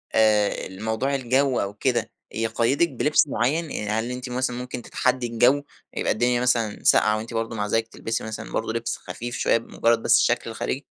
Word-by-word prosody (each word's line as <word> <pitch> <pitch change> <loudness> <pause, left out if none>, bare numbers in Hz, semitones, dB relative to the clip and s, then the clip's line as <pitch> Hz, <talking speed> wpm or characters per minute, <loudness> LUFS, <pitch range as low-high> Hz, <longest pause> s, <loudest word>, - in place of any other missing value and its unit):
آآ 105 -2 +4 0.2
ال 95 +3 -10
موضوع 120 +5 0
الجو 130 +1 +1
أو 100 0 -2
كده 100 - -1 0.2
يقيّدِك 115 +8 +1
بلبس 150 0 +2
معين؟ 145 +6 0
يعني 105 - -3
هل 110 +3 -1
أنتِ 125 0 -5
مثلًا 125 0 -1
ممكن 125 0 -5
تتحدي 130 0 0
الجو، 125 +5 +3 0.3
يبقى - - 0
الدنيا 120 +2 +1
مثلًا 115 -4 0
ساقعة 110 0 +4
وأنتِ 115 +2 -7
برضو 115 0 -2
مع 105 -1 -2
ذلك 115 +1 0
تلبسي 115 0 -4
مثلًا 110 0 -6
برضو 110 - -2
لبس 115 0 -3
خفيف 120 +1 -6
شوية - - +3
بمجرد 115 0 0
بس - - +5
الشكل 120 -1 +1
الخارجي؟ 130 +5 -4
115 Hz, 185 wpm, -24 LUFS, 110-125 Hz, 0.3 s, بس